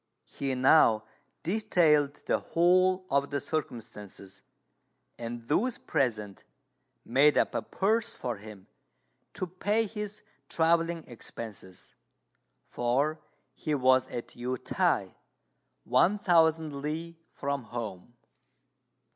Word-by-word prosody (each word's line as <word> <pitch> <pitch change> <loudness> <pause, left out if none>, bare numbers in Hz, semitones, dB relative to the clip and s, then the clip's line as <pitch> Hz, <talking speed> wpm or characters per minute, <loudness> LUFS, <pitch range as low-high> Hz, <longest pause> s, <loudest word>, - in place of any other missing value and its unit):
He 135 -1 -3
now 125 -4 +5 0.4
detailed 165 -7 +3
the - - +1
whole 185 +2 +3
of 140 +1 +2
the 140 - -1
circumstances, 105 -9 -6 0.8
and 115 0 -6
those 230 - +1
present 110 -6 -2 0.6
made 140 +5 +4
up - - +2
a - - 0
purse 225 +4 0
for 120 - -4
him 105 -2 -12 0.7
to - - -3
pay 205 +5 0
his 210 0 -6 0.3
travelling 165 0 +2
expenses; 110 -5 -9 0.7
for 140 +6 0 0.3
he 155 -2 -2
was 130 -1 +4
at 120 - -6
Yü 125 +1 -4
t'ai - - +1 0.7
one 150 - +3
thousand 160 -6 +2
li 165 +3 -4
from 140 -3 -3
home. 115 -2 -7
145 Hz, 105 wpm, -29 LUFS, 120-170 Hz, 0.8 s, now